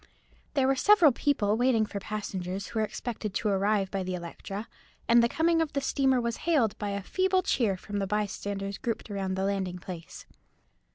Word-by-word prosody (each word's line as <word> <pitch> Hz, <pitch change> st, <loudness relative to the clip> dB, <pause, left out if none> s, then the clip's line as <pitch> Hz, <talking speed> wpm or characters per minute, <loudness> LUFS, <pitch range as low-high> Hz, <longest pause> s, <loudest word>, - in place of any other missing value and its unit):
There 270 Hz, -2 st, +3 dB
were 270 Hz, +1 st, +3 dB
several 350 Hz, +1 st, +6 dB
people 235 Hz, -6 st, +1 dB
waiting 240 Hz, -2 st, +3 dB
for 205 Hz, -1 st, -5 dB
passengers 195 Hz, -2 st, -4 dB
who 225 Hz, -, -3 dB
were 215 Hz, -, +2 dB
expected 215 Hz, -1 st, -5 dB
to 215 Hz, -, 0 dB
arrive 200 Hz, 0 st, +1 dB
by 195 Hz, -, -1 dB
the 185 Hz, 0 st, -3 dB
Electra, 195 Hz, +4 st, -6 dB, 0.4 s
and 235 Hz, 0 st, +6 dB
the 235 Hz, -, +3 dB
coming 330 Hz, +3 st, +2 dB
of 320 Hz, -, -2 dB
the 280 Hz, -, +1 dB
steamer 265 Hz, -2 st, +2 dB
was 235 Hz, -1 st, -2 dB
hailed 280 Hz, -11 st, +2 dB
by 205 Hz, -, -2 dB
a 200 Hz, -1 st, -3 dB
feeble 375 Hz, -, +1 dB
cheer 225 Hz, -, +1 dB
from 205 Hz, +2 st, -5 dB
the 195 Hz, -, -1 dB
bystanders 200 Hz, -1 st, -3 dB
grouped 230 Hz, -2 st, -3 dB
about 190 Hz, -2 st, -2 dB
the 190 Hz, -, -1 dB
landing 190 Hz, -2 st, -1 dB
place. 175 Hz, -2 st, -9 dB
210 Hz, 190 wpm, -28 LUFS, 195-255 Hz, 0.4 s, several